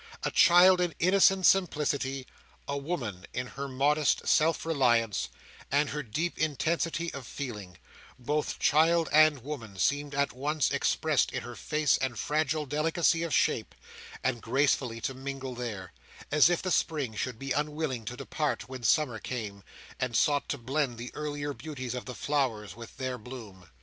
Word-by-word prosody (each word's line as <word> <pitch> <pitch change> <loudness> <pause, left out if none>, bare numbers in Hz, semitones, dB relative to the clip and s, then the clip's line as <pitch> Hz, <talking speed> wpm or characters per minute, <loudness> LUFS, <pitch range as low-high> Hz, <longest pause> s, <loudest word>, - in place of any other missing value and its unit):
A - - 0
child 180 +1 +6
in 175 -2 -1
innocent 190 +1 +4
simplicity; 145 -8 +2 0.4
a 140 - -2
woman 135 - -4
in 125 - -1
her 135 +3 -6
modest 140 +2 +1
self 160 +1 +3
reliance, 120 - +2 0.4
and 145 +1 +2
her 150 - -3
deep 155 +8 -3
intensity 165 +2 -1
of 135 -4 -7
feeling; 105 -10 -7 0.4
both 145 +4 -2
child 165 +1 +3
and 155 -4 +5
woman 115 -9 -7
seemed 145 +6 0
at 140 0 +1
once 145 +3 0
expressed - - +1
in - - -4
her - - -7
face 150 -1 +1
and 130 -3 -2
fragile 155 +4 0
delicacy 160 +3 +1
of 170 -1 -2
shape, - - +1 0.5
and 125 -3 0
gracefully 125 -1 +1
to 135 - -2
mingle 135 0 -6
there;—as 120 - -1
if 175 - 0
the 185 - -1
spring 145 -9 0
should 125 +2 -3
be 135 +3 -6
unwilling 150 -3 -1
to 125 +3 -5
depart 150 +3 -2
when 130 -1 -8
summer 120 0 +2
came, 105 -5 -5 0.4
and 125 -2 -2
sought 145 -1 +2
to 140 - -1
blend 130 0 -1
the 120 +1 -7
earlier 145 -1 -4
beauties 130 -5 -6
of 125 - -5
the 125 - -7
flowers 115 - -1
with 115 0 -11
their 130 -1 -3
bloom. 110 -7 -11
140 Hz, 160 wpm, -29 LUFS, 125-155 Hz, 0.5 s, child